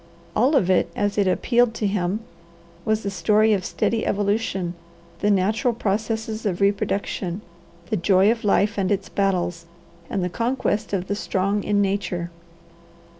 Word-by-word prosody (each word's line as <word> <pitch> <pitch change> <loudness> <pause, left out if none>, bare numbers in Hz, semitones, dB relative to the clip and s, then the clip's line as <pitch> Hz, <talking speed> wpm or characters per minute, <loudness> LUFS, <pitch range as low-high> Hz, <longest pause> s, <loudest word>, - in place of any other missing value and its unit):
All 260 +8 +3
of 210 -10 +3
it, 185 -1 +3
as 205 0 0
it 200 - +3
appealed 235 +4 +2
to 220 - -2
him, 195 +1 0 0.6
was 215 0 +1
the 200 - -2
story 215 +2 +3
of 190 -3 0
steady 225 +4 -1
evolution, 200 -3 0 0.5
the 205 - +1
natural 215 +5 +2
processes 220 +1 -2
of 190 -5 -1
reproduction, 200 -1 -1 0.5
the 215 - +2
joy 190 +3 +4
of 230 -1 -3
life 205 0 +2
and 190 0 0
its 195 -1 -1
battles, 180 -4 -1 0.4
and 195 - -1
the - - +1
conquest 230 0 -1
of 190 -2 -1
the - - -1
strong 200 0 -1
in 205 -1 +2
nature. 185 -3 -2
205 Hz, 155 wpm, -23 LUFS, 190-215 Hz, 0.6 s, joy